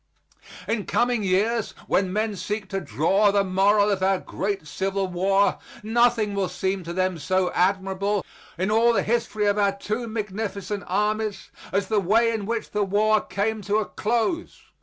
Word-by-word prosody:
In 220 -3 -2
coming 240 -1 +1
years 210 +4 0
when 190 -1 +1
men 215 +1 -1
seek 205 +2 -4
to 195 -1 -2
draw 170 - +2
the 200 0 +2
moral 200 +2 +3
of 195 -2 -1
our 190 0 +3
great 195 -2 -4
Civil 195 +6 -2
War, 195 +2 +2 0.2
nothing 225 -1 +2
will 195 -2 -1
seem 190 +1 -2
to 170 - -5
them 185 -1 -1
so 185 +3 0
admirable 195 +2 0 0.3
in 190 +4 0
all 230 +2 +4
the - - +1
history 220 -2 0
of 205 0 +2
our 200 -1 +3
two 215 +4 -3
magnificent 205 -2 -4
armies 210 +2 -1 0.2
as 195 0 0
the 215 0 +2
way 225 +5 +3
in 215 -3 -3
which 230 -1 -3
the 210 0 +1
war 210 +2 +2
came 210 +3 -2
to 205 +1 -1
a 215 - 0
close. 240 - -2
205 Hz, 170 wpm, -24 LUFS, 190-215 Hz, 0.3 s, all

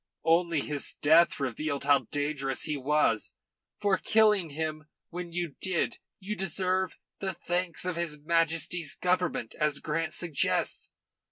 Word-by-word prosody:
Only 165 -1 +3
his 145 -1 -1
death 160 +3 +5
revealed 140 +2 -2
how 140 -4 +3
dangerous 145 -2 -1
he 155 - -1
was. 140 -5 +1 0.4
For 200 -2 +2
killing 210 -6 +3
him 155 +1 -4 0.3
when 175 0 -5
you 170 -3 -3
did 190 +5 0 0.2
you 205 +2 -4
deserve 185 0 -1 0.2
the 190 -1 -2
thanks 175 -1 -2
of 180 -2 -2
his 170 -3 0
Majesty's 165 +1 +1
Government, 180 -9 0
as 150 -1 +2
Grant 160 +3 -2
suggests. 160 -7 0
165 Hz, 135 wpm, -29 LUFS, 150-180 Hz, 0.4 s, death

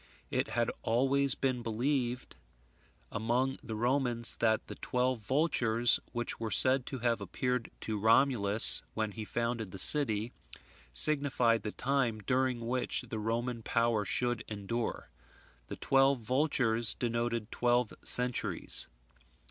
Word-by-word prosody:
It - - -1
had 120 -1 -1
always 135 +3 +1
been 130 -2 -2
believed 125 +2 -2 0.8
among 120 +5 -1
the 110 -1 -7
Romans 120 0 +1
that 110 -1 +1
the - - -8
twelve 125 0 -2
vultures 120 -2 +2
which 120 -1 -4
were 115 -1 -3
said 130 +3 +5
to 135 - -5
have 115 -2 -1
appeared 125 +5 -3
to 110 -2 -4
Romulus 110 -2 +3
when 110 -1 -2
he 110 +2 -7
founded 115 -1 -3
the 95 - -9
city, 110 -1 +1 0.6
signified 125 - +4
the 105 - -5
time 130 -4 -1
during 125 +2 -1
which 125 +1 0
the 110 - -4
Roman 115 +2 -3
power 115 -1 0
should 120 +3 -1
endure. 110 +3 -5 0.6
The - - -7
twelve 135 0 +2
vultures 120 -2 +1
denoted 115 -2 -3
twelve 120 -1 0
centuries. 125 0 -1
120 Hz, 125 wpm, -31 LUFS, 110-130 Hz, 0.8 s, said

